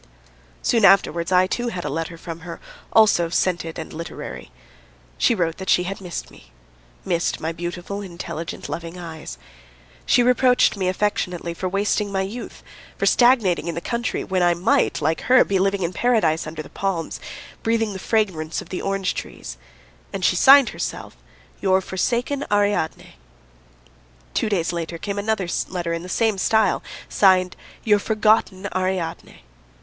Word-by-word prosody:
Soon 230 -3 +2
afterwards 185 -3 +4
I, 185 0 +5
too, 240 +6 -2
had 180 -7 -4
a - - -1
letter 165 +3 -4
from 165 0 -7
her, 170 0 -8 0.3
also 205 -6 +4
scented 170 -2 -1
and 160 - -7
literary. 165 - -7 0.7
She 235 - +3
wrote 165 -4 -1
that 190 - -6
she 180 - +4
had 195 +2 -5
missed 180 -2 -6
me, - - -18 0.5
missed 170 -1 0
my 160 - -2
beautiful, 175 +4 -5
intelligent, 170 -3 -6
loving 170 +1 -6
eyes. 160 - -8 0.7
She 245 - +5
reproached 250 0 +4
me 190 -2 -1
affectionately 180 -3 -1
for 185 +2 -3
wasting 205 +1 0
my 190 -1 0
youth, 215 +6 -7 0.3
for - - 0
stagnating 230 -10 +4
in 170 - -3
the - - -2
country 235 +5 -2
when 190 -2 -1
I 175 -1 +4
might, 225 - +1
like 160 +2 +1
her, 255 0 +5
be 195 -1 0
living 195 0 +1
in 170 +2 -2
paradise 180 -10 +1
under 155 0 -6
the - - -13
palms, 190 -4 -3 0.4
breathing 225 -2 0
the 190 - -6
fragrance 185 -7 -1
of - - -9
the 185 - -4
orange 195 -1 -1
trees. - - -7 0.6
And - - -2
she - - +3
signed 275 -1 +7
herself - - -5 0.5
"Your 190 -1 +3
forsaken 240 +9 -1
Ariadne." 205 - 0 1.2
Two - - 0
days 175 -4 0
later 170 0 -4
came 200 +3 -4
another 200 -3 -1 0.2
letter 175 -2 -3
in 165 - -3
the 180 - -9
same 220 0 +1
style, 220 +3 +2 0.3
signed 185 -2 +3 0.3
"Your 210 -2 +4
forgotten 215 -2 +1
Ariadne." 185 -3 -3
185 Hz, 160 wpm, -22 LUFS, 170-210 Hz, 1.2 s, signed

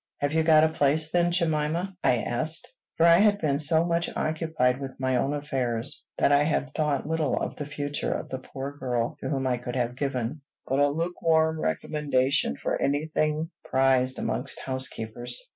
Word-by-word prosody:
"Have 145 +1 -1
you 160 - +3
got 155 -1 +5
a 160 - +4
place, 155 +1 +1
then, 175 0 +3
Jemima?" 170 +2 0
I 125 - +4
asked; 155 +7 -2 0.2
for 165 - +4
I 170 0 +7
had 205 0 +4
been 145 -4 0
so 160 +2 +4
much 170 0 0
occupied 155 -5 0
with 135 -1 -7
my 130 -1 0
own 135 +3 0
affairs 135 -4 -2
that - - +3
I 145 0 +5
had 145 -2 0
thought 150 -3 0
little 160 -3 0
of - - -4
the 145 - -6
future 145 0 -3
of - - -3
the 130 - -4
poor 135 +2 -7
girl 125 -4 -2
to - - -4
whom 135 -3 -1
I 125 -1 +1
could 120 0 -6
have 125 -1 -1
given 135 +1 -3 0.2
but 135 +1 0
a 145 0 +4
lukewarm 160 0 +1
recommendation 135 - 0
for - - -2
any 145 +3 0
thing 155 +2 0
prized 130 -1 +2
amongst 135 +2 -2
housekeepers. 120 -2 -2
145 Hz, 185 wpm, -26 LUFS, 130-160 Hz, 0.2 s, I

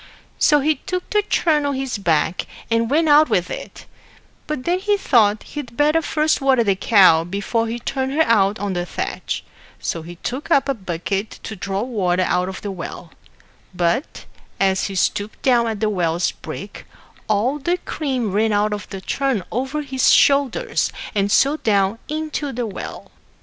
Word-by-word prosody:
So 295 -1 +4
he 310 +2 +2
took 365 -1 -4
the 420 - +3
churn 320 -7 +1
on 285 -1 -1
his 265 -4 -3
back, 165 -2 0 0.2
and 230 0 +2
went 315 +4 +2
out 300 +1 +6
with - - 0
it; - - -8 0.6
but 300 -4 -3
then 355 +4 +1
he 410 +1 +1
thought 220 - +3
he'd 250 -6 -8
better 300 +2 +3
first 310 0 +1
water 265 -3 +3
the 200 -3 +2
cow 185 -6 +5
before 200 +6 -1
he 230 +1 -3
turned 265 +2 -3
her 320 +2 +4
out 210 -5 +3
on 200 -1 -3
the 175 -1 -1
thatch; - - -4 0.4
so 165 - -3
he 170 +2 -9
took 255 - -5
up 280 -5 +3
a 275 - +1
bucket 195 0 -3
to 220 - -6
draw 195 +1 -3
water 185 -7 0
out 180 0 0
of 190 - -8
the 205 - -3
well; 170 -2 -8 0.6
but, 175 - -1 0.3
as 190 -1 +2
he 195 - -5
stooped 205 +3 -1
down 240 -3 +3
at 220 -2 -3
the 215 - +2
well's 175 -3 0
brink, - - -9 0.4
all 225 +8 +1
the 345 +6 0
cream 260 - -3
ran 215 +3 +2
out 210 0 +1
of 205 -2 -6
the 195 - -7
churn 265 -1 -1
over 265 +5 -2
his 265 -2 +2
shoulders, 280 -3 +3 0.2
and 200 -1 0
so 280 +7 +4
down 200 -3 +1
into 305 -2 -3
the 240 0 -3
well. 205 - -7
230 Hz, 180 wpm, -21 LUFS, 195-285 Hz, 0.6 s, out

